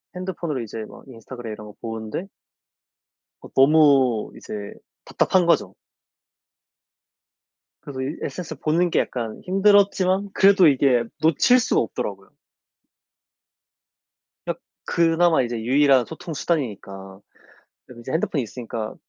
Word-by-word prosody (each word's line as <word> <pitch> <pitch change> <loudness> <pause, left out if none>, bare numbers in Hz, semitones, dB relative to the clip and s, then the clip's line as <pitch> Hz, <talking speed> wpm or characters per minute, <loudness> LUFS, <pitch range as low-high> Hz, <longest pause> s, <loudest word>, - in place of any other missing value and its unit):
핸드폰으로 175 -6 -4
이제 110 -1 -7
막 - - -14
인스타그램 120 -2 -9
이런 105 0 -10
거 105 - -12
보는데 110 - -5 1.1
어 - - -12
너무 135 -5 +4
이제 105 -1 -8 0.3
답답한 185 -2 +1
거죠. 170 - +1 2.1
그래서 135 -3 -7
이 135 +4 -4
SNS 180 -3 -6
보는 170 +3 +1
게 - - +1
약간 115 -3 -4
힘들었지만 195 0 +3
그래도 195 -2 +5
이게 130 -4 +3 0.2
놓칠 165 - +4
수가 235 - +1
없더라고요. - - -5 2.2
그냥 - - -3 0.3
그나마 170 -1 +2
이제 120 -1 -3
유일한 135 +1 +3
소통 160 +1 -8
수단이니까 100 - -4 0.7
그래도 120 -2 -13
인제 130 +3 -7
핸드폰이 160 -3 -1
있으니까 115 -1 -6
140 Hz, 285 characters per minute, -22 LUFS, 115-170 Hz, 2.2 s, 그래도